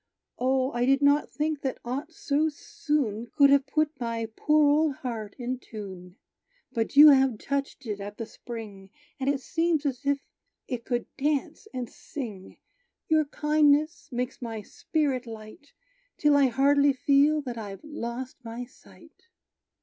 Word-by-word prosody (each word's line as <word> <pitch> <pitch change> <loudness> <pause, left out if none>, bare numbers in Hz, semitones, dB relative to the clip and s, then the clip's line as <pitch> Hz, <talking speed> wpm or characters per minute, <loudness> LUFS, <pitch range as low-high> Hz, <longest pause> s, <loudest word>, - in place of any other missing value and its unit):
O, 260 +1 +1
I 240 +1 0
did 275 +1 +3
not 285 +1 +4
think 300 -1 -2
that 265 - -2
aught 270 +7 -4
so 310 -1 0
soon 295 - -2
Could 280 -2 +6
have 280 -1 +4
put 305 0 0
my 230 -2 -2
poor 305 0 +3
old 295 0 +3
heart 225 -6 -5
in 250 0 -3
tune. 190 -6 -9 0.6
But 230 -1 -2
you 300 +2 +11
have 265 -4 +4
touched 280 +2 -3
it 210 -3 -4
at 205 +1 -7
the 230 - -4
spring, 215 -5 -9 0.3
And 270 +1 0
it 280 -2 0
seems 325 0 0
as 270 -1 -2
if 280 0 +1 0.5
it 240 -2 -4
could 240 -2 -1
dance 295 +8 -1
and 250 -2 -4
sing. 215 -7 -8 0.5
Your 315 -1 +4
kindness 300 +2 +2
makes 250 +2 -3
my 225 -3 -5
spirit 270 0 -2
light, 220 +5 -11 0.5
Till 295 -1 +4
I 280 -1 +5
hardly 280 +3 +4
feel 285 +2 +3
that 245 -3 -5
I've 200 0 -8
lost 260 -3 -6
my 235 +1 -6
sight!" 325 +7 -20
270 Hz, 155 wpm, -27 LUFS, 235-295 Hz, 0.6 s, you